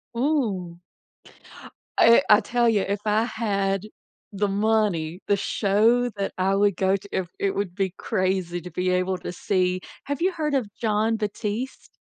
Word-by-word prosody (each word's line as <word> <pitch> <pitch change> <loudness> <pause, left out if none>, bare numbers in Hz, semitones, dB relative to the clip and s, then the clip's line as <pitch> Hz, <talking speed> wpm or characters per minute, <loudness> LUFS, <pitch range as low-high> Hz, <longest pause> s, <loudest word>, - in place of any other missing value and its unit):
Ooh. 220 - -1 1.2
I 230 0 +7
I 210 0 +8
tell 240 +2 +1
ya, 210 -4 +2
if 200 0 -1
I 210 +1 +3
had 200 -4 -1 0.4
the 205 +1 0
money, 200 -5 0
the 205 - +4
show 220 +5 +2
that 200 -2 -3
I 190 +1 +1
would 200 -1 +3
go 190 0 +2
to 200 +1 -7
it 185 -2 -2
it 195 - 0
would 200 -3 -2
be 190 -2 -1
crazy 185 -2 -1
to 180 - -8
be 180 +3 -1
able 185 +1 0
to - - -6
see. 185 0 0 0.2
Have 285 +2 -3
you 375 +2 +3
heard 305 -4 -2
of 255 -6 +1
John 220 0 +1
Batiste? 215 +4 -4
200 Hz, 165 wpm, -24 LUFS, 185-225 Hz, 1.2 s, I